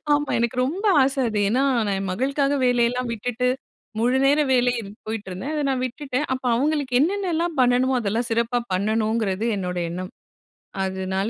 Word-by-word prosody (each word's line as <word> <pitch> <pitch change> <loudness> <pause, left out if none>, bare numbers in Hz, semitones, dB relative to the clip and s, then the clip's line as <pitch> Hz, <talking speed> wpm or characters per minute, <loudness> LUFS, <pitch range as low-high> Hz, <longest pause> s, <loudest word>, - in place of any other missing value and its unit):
ஆமா. 290 0 +1
எனக்கு 235 +1 -1
ரொம்ப 355 +10 -3 0.2
ஆசை 270 +1 +1
அது. 215 -1 -2
ஏனா, 250 +6 +2 0.2
நான் 200 - 0
என் 195 0 -3
மகளுக்காக 275 +7 0
வேலையெல்லாம் 245 0 +1
விட்டுட்டு, 245 +2 -1 0.5
முழுநேர 265 +5 +3
வேலை 245 -1 +3 0.3
போயிட்டுருந்தேன். 215 +4 -5
அத 300 - -1
நான் 260 -1 -1
விட்டுட்டேன். 270 +2 -3
அப்ப 260 0 -3
அவங்களுக்கு 275 -1 +1
என்னென்னலாம் 345 -1 0
பண்ணணுமோ, 250 +1 +3
அதெல்லாம் 230 +3 -1
சிறப்பா 235 +2 +1
பண்ணணுங்கிறது 215 +1 0
என்னோட 180 -2 -3
எண்ணம். 185 +2 -5 0.7
அதனால 190 +1 -2
245 Hz, 145 wpm, -23 LUFS, 215-275 Hz, 0.7 s, முழுநேர